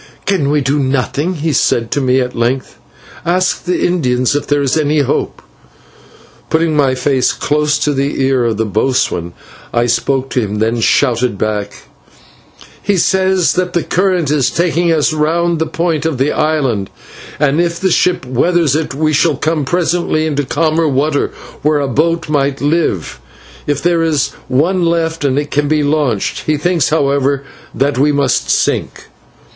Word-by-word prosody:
"Can 185 -8 +1
we 150 0 +2
do 140 +2 0
nothing?" 140 +6 -1
he 155 0 -2
said 115 -3 +1
to 145 - 0
me 130 0 +2
at 125 0 -3
length. 120 +3 -2 0.4
"Ask 180 +2 0
the 180 0 0
Indians 130 -8 +1
if 145 - -2
there 145 -1 +1
is 135 - +1
any 150 -1 +2
hope." 140 - -2 1.1
Putting 160 -1 +1
my 135 -3 +2
face 130 -1 +1
close 150 0 0
to 150 -1 0
the 140 +1 -1
ear 130 -2 +2
of 115 -3 -1
the 110 - 0
boatswain, 105 -5 -1 0.4
I 120 0 +1
spoke 130 +3 0
to - - +1
him, 105 -2 -3
then 115 +2 0
shouted 120 -2 +1
back: 105 -1 -3 1.0
"He 200 -2 0
says 190 0 +2
that 180 0 -1
the 170 - 0
current 180 -5 0
is 145 -4 +2
taking 170 0 +1
us 155 -1 +2
round 165 +2 0
the 160 - 0
point 165 -1 -1
of 155 -5 -2
the 135 +3 +1
island, 140 -10 0 0.5
and 150 +2 +2
if 170 -1 -1
the 190 -1 +1
ship 180 -4 +1
weathers 155 +4 +1
it, 155 -3 -2
we 155 +1 0
shall 155 -1 +2
come 155 -1 -1
presently 170 -1 0
into 145 -2 -1
calmer 160 +3 +1
water, 145 +1 +1 0.3
where 150 0 +2
a 140 - -1
boat 165 +6 0
might 140 -2 0
live, 145 - -1 0.5
if 145 -1 -1
there 170 -1 +2
is 150 -4 +1 0.2
one 170 +8 +1
left 165 -1 0
and 135 -1 +1
it 145 0 -2
can 145 0 +1
be 155 0 +1
launched. 145 -8 -1
He 155 -1 +2
thinks, 170 -1 +1
however, 140 -2 +1 0.3
that 140 -1 0
we 145 +2 +3
must 140 -3 0
sink." - - 0
145 Hz, 170 wpm, -15 LUFS, 130-165 Hz, 1.1 s, we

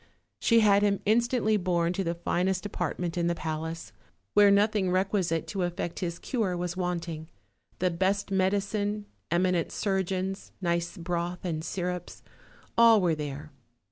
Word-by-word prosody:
She 230 -1 +4
had 205 -1 +5
him 200 -1 +2
instantly 225 0 +2
borne 175 -2 +1
to 195 - -1
the 170 -1 -1
finest 180 +3 0
apartment 175 -2 -2
in 170 - +1
the 170 - +1
palace, 160 +1 -5 0.4
where 205 -1 +7
nothing 205 -1 +3
requi 190 +2 +1
site 165 -2 -1
to 195 - -2
effect 175 -1 -3
his 170 -2 -3
cure 205 -7 -1
was 175 0 -3
wanting; 170 -3 -3 0.5
the 185 0 +1
best 190 +4 0
medicine, 205 +2 0 0.2
eminent 175 -1 +1
surgeons, 190 -1 -2
nice 170 +1 -1
broth 175 +1 -3
and 160 -3 -2
syrups, 180 0 -4 0.5
all 230 -2 +7
were 175 -4 +2
there. 150 0 -5
180 Hz, 145 wpm, -28 LUFS, 170-200 Hz, 0.5 s, where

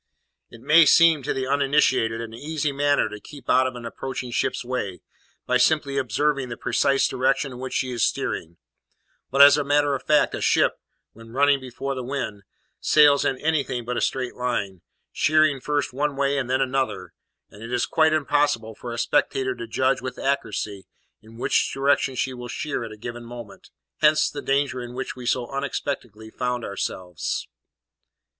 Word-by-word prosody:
It 115 - -14
may 160 +3 +6
seem 165 -3 +6
to 135 - -3
the 130 - -2
uninitiated 135 -4 +2
an 115 -1 -7
easy 150 +4 -2
matter 145 -2 +2
to 105 -1 -8
keep 140 +2 -13
out 130 0 +4
of 130 - -6
an 120 -1 -8
approaching 125 +1 -5
ship's 120 - -1
way, 100 -8 -4 0.4
by 125 - +2
simply 140 +1 +2
observing 135 +2 0
the 120 - -6
precise 140 -1 +2
direction 135 +2 0
in 125 - -9
which 130 0 -5
she 130 - -1
is 120 - -1
steering; 85 +1 -2 0.7
but, 135 +2 +7
as 145 +1 +7
a - - 0
matter 145 0 +2
of 135 - -2
fact, 150 +1 +2
a - - -4
ship, - - +2 0.3
when 115 +1 -14
running 140 +1 +3
before 130 +1 -5
the 130 - -4
wind, 125 -6 -4 0.4
sails 145 -2 +5
in 130 - 0
anything 140 -5 -1
but 125 +1 -3
a - - -1
straight 130 -2 -1
line, 105 -7 -3 0.3
sheering 155 -2 +3
first 145 -3 -1
one 145 +2 -1
way 140 0 +1
and 125 -2 -4
then 130 +1 +1
another, 130 -9 -2 0.4
and 105 - -14
it 115 +1 -7
is 125 -1 +1
quite 160 0 +3
impossible 145 -7 +1
for 120 +3 -8
a 120 - -5
spectator 130 0 +1
to 120 -1 -8
judge 130 +4 +1
with 130 -1 -6
accuracy 105 -7 -2 0.3
in 110 +1 -16
which - - +1
direction 135 -1 +1
she 130 +1 -1
will 125 -1 -8
sheer 145 -1 -3
at 115 - -7
a 110 - -10
given 120 +2 -7
moment; 120 -4 -11 0.3
hence 155 0 +4
the 145 - -6
danger 135 -2 0
in 120 0 -8
which 130 - -4
we 125 -1 -8
so 125 0 +1
unexpectedly 130 -5 -4
found 125 -1 -2
ourselves. 90 -3 -4
130 Hz, 185 wpm, -24 LUFS, 120-145 Hz, 0.7 s, but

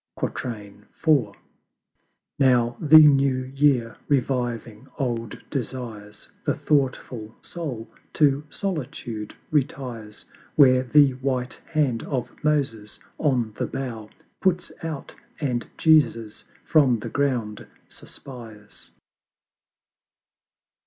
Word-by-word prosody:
IV. 110 +2 -1 1.1
Now 120 -3 +3
the 155 0 +7
New 140 -4 +6
Year 135 -5 +2
reviving 125 -3 -1
old 115 -5 -2
Desires, 115 -6 -6 0.2
The - - 0
thoughtful 130 -6 -1
Soul 135 -10 -6 0.3
to 145 -1 +3
Solitude 125 - -5 0.2
retires, 125 -7 -3 0.3
Where 130 -3 +6
the 140 +2 +5
WHITE 130 -1 -2
HAND 145 -8 0
OF 125 -4 -3
MOSES 130 -9 -1 0.2
on 125 -7 +1
the - - 0
Bough 120 -5 -5 0.3
Puts 180 -2 0
out, 160 -4 -6 0.3
and 125 -5 -2
Jesus 120 -9 +2 0.2
from 140 -7 +4
the 110 - -6
Ground 120 -7 -1 0.2
suspires. 110 -5 -12
130 Hz, 90 wpm, -24 LUFS, 115-145 Hz, 1.1 s, the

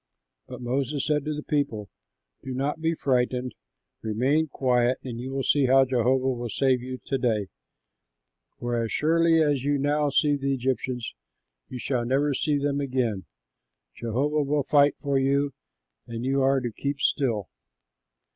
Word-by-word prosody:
'" - - -56
But - - -9
Moses 135 +3 -1
said 150 -1 0
to 155 0 -2
the 150 - -5
people, 115 -9 -1 0.5
"Do 130 -1 -6
not 145 +4 -2
be 165 +1 +1
frightened, 125 -2 0 0.5
remain 130 +9 +1
quiet 125 -2 +1
and 120 -3 -6
you 125 +2 -5
will 135 0 -2
see 140 -1 +3
how 135 +1 +6
Jehovah 130 +1 +1
will 120 -1 -4
save 130 +1 +1
you 130 +1 -6
to 135 - -1
day; 110 -5 0 1.1
for 120 -1 -1
as 115 - -4
surely 165 +3 +3
as 145 -4 +1
you 145 0 +1
now 145 +1 +1
see 145 +1 +3
the 140 0 0
Egyptians 125 -2 -2 0.6
you 125 - -6
shall 125 0 -1
never 140 +4 +1
see 145 +2 +1
them 140 0 -1
again. 125 -8 -1 0.7
Jehovah 135 - -1
will 145 0 0
fight 145 +1 +4
for 140 -2 0
you, 140 +1 +1 0.5
and 115 +1 -5
you 135 +1 +1
are 135 0 +3
to 120 -2 -3
keep 140 +5 -3
still." 115 -11 0
135 Hz, 165 wpm, -26 LUFS, 125-145 Hz, 1.1 s, how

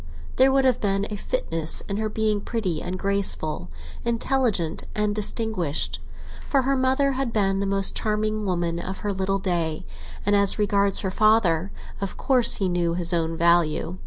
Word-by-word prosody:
There 265 +1 +5
would 270 0 +2
have 255 -2 +2
been 195 -1 0
a - - -3
fitness 165 - -2
in 200 - -5
her 215 0 -2
being 215 -1 -1
pretty 190 -10 -3
and 180 +1 -4
graceful, 195 - 0 0.3
intelligent 230 -7 0
and 210 0 0
distinguished; 210 -7 0 0.5
for 275 -2 +2
her 275 +2 +1
mother 265 +2 +2
had 265 -2 -2
been 195 -3 +1
the 200 - -1
most 195 0 0
charming 215 0 -1
woman 175 -3 -1
of 190 +2 -6
her 205 -1 -2
little 190 +1 -1
day, 170 -5 -2 0.4
and 205 +1 +3
as 200 -1 +4
regards 200 -1 +2
her 190 - -2
father, 200 -5 +2 0.3
of 195 - -4
course 255 -4 +3
he 195 - 0
knew 175 -1 0
his 175 0 0
own 165 -1 0
value. 170 +1 +2
200 Hz, 170 wpm, -24 LUFS, 175-220 Hz, 0.5 s, There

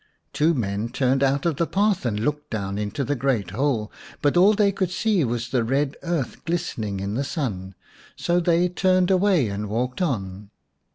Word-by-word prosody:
Two 155 +4 +2
men 105 -2 -2
turned 130 +2 +1
out 135 +2 +1
of 165 -4 +1
the 170 - +1
path 200 - +1
and 105 -2 -1
looked 150 +6 -2
down 100 -2 -3
into 105 +7 -2
the 145 - -1
great 120 -8 0
hole, 115 -2 -1 0.3
but 145 +2 +3
all 190 +4 +6
they 200 -1 +3
could 190 -2 -1
see 190 -1 +1
was 120 -1 -2
the 125 -1 +1
red 135 +4 0
earth 165 -8 -3
glistening 110 - -2
in 100 +1 -3
the 130 +5 -1
sun, 100 - -4 0.4
so 175 +1 +1
they 175 0 +3
turned 185 +1 +2
away 185 - +3
and 100 +1 -4
walked 125 - -2
on. 100 - -2
135 Hz, 185 wpm, -24 LUFS, 110-175 Hz, 0.4 s, all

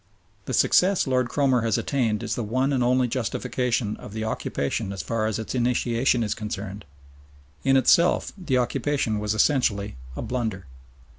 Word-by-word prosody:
The - - -4
success 190 +1 +4
Lord 125 -2 +1
Cromer 130 -4 +2
has 115 -2 +1
attained 115 -7 0
is - - -2
the 120 - -2
one 130 +6 0
and 130 -2 +1
only 125 +1 +3
justification 120 -2 -1
of 105 - -11
the 110 0 -3
occupation 100 -2 -2
as 95 - -5
far 115 -1 -1
as 110 - -1
its 110 - -5
initiation 120 0 +1
is 105 - -1
concerned. 105 -2 -6 0.8
In 135 0 +4
itself 170 +7 +3
the 165 -10 -1
occupation 125 -2 0
was 105 +1 -1
essentially 110 - +1 0.2
a - - -4
blunder. 110 -7 -3
120 Hz, 160 wpm, -25 LUFS, 110-130 Hz, 0.8 s, success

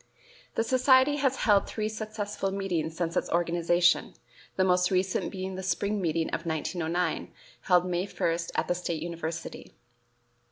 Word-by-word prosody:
The 225 - +2
society 260 +3 +4
has 270 -2 +1
held 205 -2 +4
three 215 -1 -2
successful 215 -2 -3
meetings 175 -5 -2
since 170 -1 -2
its - - 0
organization, 175 0 +2 0.4
the 190 - +2
most 180 -1 +3
recent 185 0 0
being 190 0 -4
the 190 - -5
spring 200 +2 -1
meeting 165 -2 0
of 165 - -2
1909, 170 +2 -2 0.3
held 180 -2 +4
May 180 +1 -1
1, 165 -4 0 0.2
at - - 0
the - - +2
State 170 -3 -3
University. 165 -1 -6
180 Hz, 150 wpm, -28 LUFS, 170-205 Hz, 0.4 s, society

